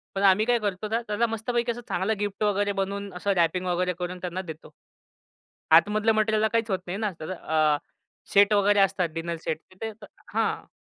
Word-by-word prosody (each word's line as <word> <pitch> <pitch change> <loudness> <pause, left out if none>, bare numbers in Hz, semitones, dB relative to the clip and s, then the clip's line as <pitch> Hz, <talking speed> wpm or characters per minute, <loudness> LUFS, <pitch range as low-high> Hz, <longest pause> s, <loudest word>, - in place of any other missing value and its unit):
पण 195 - -1
आम्ही 195 +3 +5
काय 240 -1 +3
करतो? 205 0 -2
त्याला 225 0 0
मस्तपैकी 235 +2 -1
असं 240 +1 -6
चांगला 190 +5 0
गिफ्ट 205 0 -2
वगैरे 205 0 +1
बनवून 200 +1 -4
असं 200 +3 -1
रॅपिंग 175 +2 +1
वगैरे 180 0 0
करून 180 0 -4
त्यांना 180 +1 -4
देतो. 160 -3 -9 1.0
आतमधलं 210 +7 +5
मटेरिअला 215 0 +2
काहीच 230 -1 0
होत 190 - +1
नाही 180 +3 -4
ना, 215 -2 0
त्याज 155 +3 -6
अ, 155 -4 +1 0.6
सेट 200 +1 +6
वगैरे 205 0 +4
असतात 185 -3 +2
डिनर 165 +1 -3
सेट 155 - -1
तिथे 220 +4 -6
तर - - -9 0.3
हां. - - 0
200 Hz, 185 wpm, -26 LUFS, 180-215 Hz, 1.0 s, सेट